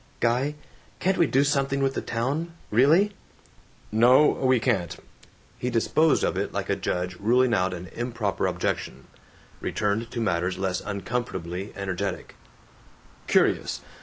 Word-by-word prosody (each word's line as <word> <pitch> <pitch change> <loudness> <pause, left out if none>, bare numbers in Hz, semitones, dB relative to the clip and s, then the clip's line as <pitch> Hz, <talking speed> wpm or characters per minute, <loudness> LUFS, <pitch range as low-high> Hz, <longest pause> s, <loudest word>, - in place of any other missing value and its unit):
"Guy! 125 +5 +1 0.4
Can't 190 +1 +1
we 170 - +5
do 135 +3 +3
something 140 -1 +1
with 135 0 +1
the - - -2
town? 145 +9 -2 0.2
Really?" 155 - +4 0.8
"No, 125 +7 +6
we 130 -2 +2
can't!" 105 -9 0 0.6
He 125 - -1
disposed 145 +6 +2
of - - +1
it - - -2
like - - -3
a - - +2
judge 90 0 -3
ruling 120 +3 +3
out 95 -3 +2
an 90 +1 -7
improper 115 -4 -2
objection; 65 - -3 0.5
returned 105 +3 -1
to 120 - -5
matters 90 -4 0
less 95 -1 -1
uncomfortably 100 -3 -4
energetic: 100 -1 -4 0.9
"Curious. - - +2
115 Hz, 135 wpm, -26 LUFS, 95-135 Hz, 0.9 s, No